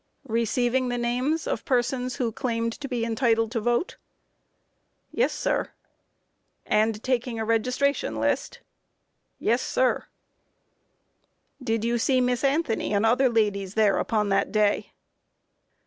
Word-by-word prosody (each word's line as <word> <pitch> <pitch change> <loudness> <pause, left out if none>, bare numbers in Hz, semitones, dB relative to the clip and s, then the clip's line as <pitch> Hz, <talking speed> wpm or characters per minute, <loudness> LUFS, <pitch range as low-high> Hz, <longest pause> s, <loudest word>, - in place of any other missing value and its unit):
Q. 230 - -8
Receiving 245 +3 +1
the 245 - -1
names 250 +7 -1
of - - -2
persons 250 0 0
who 245 -4 -1
claimed 230 0 -2
to 285 - -5
be 245 -3 -2
entitled 225 -1 +1
to 235 - -1
vote? 240 - 0
A. - - -29
Yes, 485 - +3
sir. - - -1
Q. - - -23 0.9
And 215 0 +1
taking 250 -2 -1
a 220 - -2
registration 250 +5 0
list? - - 0
A. - - -18 0.8
Yes, 240 +3 +1
sir. 255 -1 0 1.5
Q. 255 - -12
Did 225 -2 0
you 235 0 +1
see 260 +2 +2
Miss 250 0 0
Anthony 275 -7 0
and 200 +2 +2
other 250 +3 +4
ladies 205 -4 0
there 215 -2 +3
upon 210 -2 0
that 195 0 +1
day? 210 -1 +1
235 Hz, 145 wpm, -25 LUFS, 225-255 Hz, 1.5 s, other